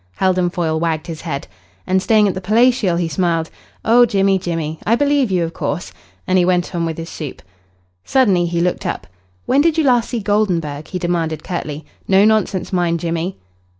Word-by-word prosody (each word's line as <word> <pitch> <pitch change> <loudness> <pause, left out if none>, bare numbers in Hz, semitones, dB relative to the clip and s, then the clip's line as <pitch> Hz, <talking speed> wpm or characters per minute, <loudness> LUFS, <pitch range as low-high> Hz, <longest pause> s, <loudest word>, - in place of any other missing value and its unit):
Heldon 185 -2 +1
Foyle 160 -3 -1
wagged 165 -1 -1
his 165 -2 -7
head. 155 -5 -4 0.4
"And 190 0 +1
staying 215 +1 +4
at 195 - 0
the 185 - -5
Palatial," 220 -1 +3
he 170 -1 0
smiled. 165 0 -1 0.3
"Oh, 240 +2 +6
Jimmy, 195 -2 +2
Jimmy! 160 -3 -3
I 230 - +3
believe 285 -2 +2
you, 180 -2 +1
of 165 0 -4
course." 160 +2 -4 0.3
And 185 0 +2
he - - +4
went 180 0 +1
on 170 -1 -1
with 160 - -4
his 165 0 -6
soup. 150 -5 -7 0.6
Suddenly 195 -10 +2
he 170 0 -1
looked 180 +1 -1
up. - - -4 0.4
"When 275 - +3
did 325 +1 +2
you 320 - +3
last 245 -4 +2
see 240 - -2
Goldenburg?" 180 -8 -1
he 185 - -4
demanded 170 -3 -2
curtly. 155 -4 -5 0.2
"No 195 +1 +5
nonsense, 215 -4 +1
mind, 170 -2 +1
Jimmy." 170 +2 -3
180 Hz, 190 wpm, -18 LUFS, 165-205 Hz, 0.6 s, Oh